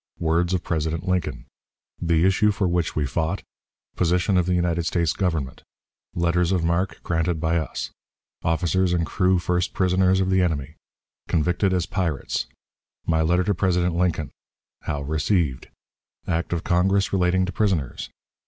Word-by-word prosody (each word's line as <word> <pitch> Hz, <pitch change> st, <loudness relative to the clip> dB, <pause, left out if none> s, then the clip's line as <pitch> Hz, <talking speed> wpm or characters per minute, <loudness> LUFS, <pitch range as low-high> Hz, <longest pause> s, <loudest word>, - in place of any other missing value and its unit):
Words 85 Hz, +2 st, +1 dB
of 90 Hz, -, -2 dB
President 80 Hz, +1 st, -2 dB
Lincoln. 90 Hz, -9 st, -1 dB, 0.6 s
The 85 Hz, 0 st, +2 dB
Issue 95 Hz, +3 st, +3 dB
for 100 Hz, -2 st, 0 dB
which 85 Hz, -1 st, 0 dB
we 75 Hz, -, +1 dB
fought. 80 Hz, +8 st, -2 dB, 0.5 s
Position 90 Hz, +3 st, +1 dB
of 90 Hz, -1 st, +2 dB
the 90 Hz, -, +2 dB
United 85 Hz, -1 st, 0 dB
States 85 Hz, -1 st, +1 dB
Government. 80 Hz, -9 st, -2 dB, 0.5 s
Letters 85 Hz, +1 st, +1 dB
of 90 Hz, -3 st, +1 dB
Marque 85 Hz, +3 st, 0 dB
granted 80 Hz, -1 st, 0 dB
by 80 Hz, +1 st, +1 dB
us. 80 Hz, -5 st, -3 dB, 0.5 s
Officers 85 Hz, +2 st, +1 dB
and 85 Hz, -1 st, +1 dB
Crew 90 Hz, +2 st, +2 dB
First 90 Hz, +1 st, -1 dB
Prisoners 95 Hz, 0 st, +3 dB
of 95 Hz, 0 st, +1 dB
the 95 Hz, 0 st, +3 dB
Enemy. 75 Hz, -5 st, -1 dB, 0.5 s
Convicted 90 Hz, +4 st, +1 dB
as 90 Hz, -2 st, +1 dB
"Pirates." 85 Hz, -10 st, -2 dB, 0.6 s
My 80 Hz, -1 st, +2 dB
Letter 90 Hz, +3 st, +2 dB
to 100 Hz, -, +1 dB
President 90 Hz, -1 st, +1 dB
Lincoln. 85 Hz, -4 st, 0 dB, 0.5 s
How 70 Hz, -1 st, -2 dB
received. 75 Hz, -1 st, 0 dB, 0.6 s
Act 85 Hz, 0 st, -1 dB
of 85 Hz, -1 st, -1 dB
Congress 95 Hz, +3 st, +2 dB
relating 95 Hz, 0 st, +2 dB
to 95 Hz, -, -4 dB
Prisoners. 90 Hz, -, -1 dB
85 Hz, 150 wpm, -24 LUFS, 80-90 Hz, 0.6 s, Issue